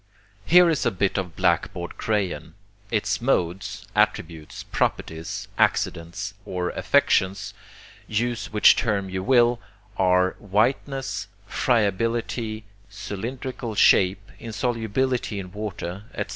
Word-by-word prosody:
Here 180 +1 +7
is 160 -4 +1
a - - +3
bit 95 +1 0
of 90 -4 -5
blackboard 85 0 0
crayon. 100 -6 -2 0.3
Its 110 +1 0
modes, 95 -7 -1
attributes, 80 -2 -1
properties, 80 +1 -2
accidents, 90 +4 0
or 90 -2 -3
affections, 95 -2 +1 0.5
use 115 -1 -2
which 105 -1 +6
term 100 -5 0
you 95 0 -2
will, 120 +1 +4 0.4
are 90 0 +3
whiteness, 125 +7 -1 0.2
friability, 115 0 0 0.3
cylindrical 115 +4 -5
shape, 95 0 +4
insolubility 115 0 -1
in 90 -2 -7
water, 100 -2 -5
etc. 105 - -3
105 Hz, 105 wpm, -24 LUFS, 95-120 Hz, 0.5 s, Here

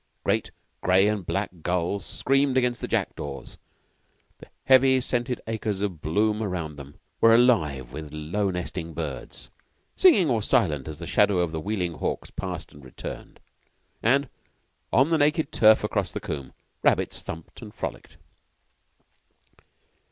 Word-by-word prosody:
Great - - 0 0.3
gray 95 +2 +4
and 105 -5 -2
black 100 +1 -1
gulls 90 +3 -1
screamed 135 0 +1
against 125 -1 +1
the - - -3
jackdaws; 70 -2 -3 0.8
the - - -13 0.2
heavy 130 0 +5
scented 125 0 -1
acres 110 -3 -3
of 95 -7 -3
bloom 105 +7 +1
round 90 -7 -3
them 70 0 -12 0.2
were 115 0 +6
alive 80 - +2
with 75 -1 -7
low 80 +7 -2
nesting 90 -2 -5
birds, - - -6 0.5
singing 305 - +6
or 120 -5 +1
silent 75 -9 +1
as 80 -1 -6
the 85 - -7
shadow 100 +2 +3
of 85 -2 +1
the 80 - -3
wheeling 90 -3 -2
hawks - - -4
passed - - -6
and 75 - -15
returned; 65 - -9 0.6
and 140 +5 +3 0.6
on 135 +5 +4
the 160 - +3
naked 150 +1 +2
turf 110 0 +5
across - - -1
the - - -4
combe 70 -3 -6 0.3
rabbits - - +1
thumped 80 0 -9
and - - -11
frolicked. - - -6
100 Hz, 145 wpm, -25 LUFS, 80-120 Hz, 0.8 s, were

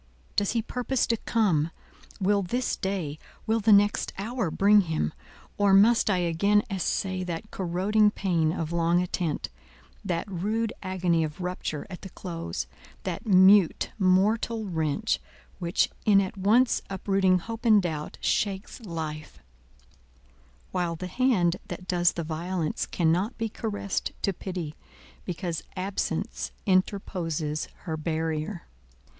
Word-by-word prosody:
Does 205 0 +1
he 230 -2 0
purpose 250 +2 0
to 230 - +1
come? 185 -10 +1 0.5
Will 200 +1 +2
this 245 +7 -1
day—will 190 +4 -3
the 220 +1 +3
next 205 +1 +4
hour 225 -1 -2
bring 205 +5 +5
him? 160 - -1 0.5
or 200 -1 +5
must 220 +3 +5
I 195 - +3
again 180 +5 +2
assay 190 0 -1
that 175 +4 -5
corroding 195 +4 +2
pain 170 -6 +1
of 165 -1 -3
long 170 0 +2
attent—that 150 - -4
rude 210 +4 -1
agony 180 -3 +1
of 155 +3 -5
rupture 180 -4 -3
at 185 -3 -9
the 190 - -8
close, 170 -2 -5 0.4
that - - -4
mute, 190 -1 +5
mortal 210 +4 +2
wrench, 165 +3 0 0.4
which, 170 -1 +2 0.2
in 205 -2 +6
at 195 +2 -2
once 220 +6 +3
uprooting 195 -1 +2
hope 225 +5 -6
and 220 -3 +6
doubt, 160 -5 -3
shakes 195 +2 -1
life; 160 -6 -6 1.3
while 175 -2 -1
the 185 - -6
hand 185 -5 +2
that 180 - -7
does 175 -2 +3
the 170 - -3
violence 165 +1 -2
cannot 180 +7 +1
be 225 -1 -2
caressed 205 -2 -3
to 195 - +1
pity, 175 -4 -5 0.5
because 175 -2 -3 0.2
absence 190 +2 -2 0.2
interposes 175 -6 0 0.2
her 160 -4 -3
barrier! 160 +3 -2
185 Hz, 125 wpm, -27 LUFS, 165-205 Hz, 1.3 s, in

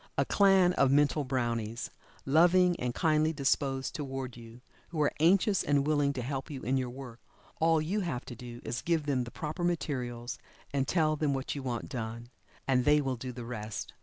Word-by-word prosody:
A - - +3
clan 195 -3 +4
of 135 - +3
mental 145 +1 +3
brownies, 120 -3 -2 0.3
loving 175 +5 +5
and 125 0 -1
kindly 155 -1 +2
disposed 135 -2 0
toward 135 -4 -5
you, 115 +1 -12 0.3
who 165 - -5
are 145 - +2
anxious 190 +4 +4
and 145 -1 +2
willing 145 -2 +2
to 130 -3 -4
help 135 +1 -4
you 140 -4 -7
in 130 - 0
your 130 -2 -1
work. 125 -2 -9 0.4
All 165 0 +4
you 175 +8 -1
have 170 -11 -3
to 120 - -8
do 120 0 -9
is 120 - -3
to - - -11
give 165 -3 +1
them 130 -4 0
the - - -7
proper 155 +7 -5
materials, 130 -8 -2 0.3
and 135 -1 0
tell 155 -3 +2
then 150 -2 0
what 135 0 -3
you 140 - -5
want 125 -3 -3
done, 115 0 -5 0.4
and 130 -2 +3
they 150 +3 +5
will 135 -3 -1
do 125 +1 -6
the 120 -1 -8
rest. 110 -3 -5
135 Hz, 200 wpm, -30 LUFS, 125-155 Hz, 0.4 s, loving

